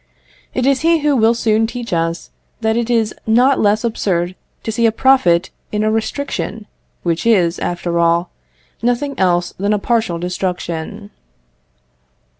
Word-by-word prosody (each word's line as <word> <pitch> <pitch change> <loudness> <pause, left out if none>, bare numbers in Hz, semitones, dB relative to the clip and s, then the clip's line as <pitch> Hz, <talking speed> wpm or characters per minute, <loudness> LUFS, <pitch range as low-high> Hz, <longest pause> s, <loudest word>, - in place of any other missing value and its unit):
It 255 - 0
is 275 -1 +3
he 330 0 +3
who 295 -1 +2
will 230 -1 +4
soon 225 -1 +2
teach 240 -3 -5
us 165 0 -2 0.3
that 220 0 +1
it 235 0 -1
is 225 -3 +1
not 250 +5 +4
less 210 +1 +2
absurd 185 -6 -1 0.3
to 220 - -2
see 230 +1 +2
a - - +3
profit 215 -8 +3 0.2
in 210 0 0
a 215 - +2
restriction, 225 -1 -3 0.4
which 170 -1 -1
is, 185 -7 +2
after 175 -1 -2
all, 170 +1 +2 0.5
nothing 245 +4 0
else 175 -2 +1
than 200 +2 +1
a - - +2
partial 220 -4 0
destruction. 180 +2 -4
215 Hz, 150 wpm, -17 LUFS, 175-235 Hz, 0.5 s, will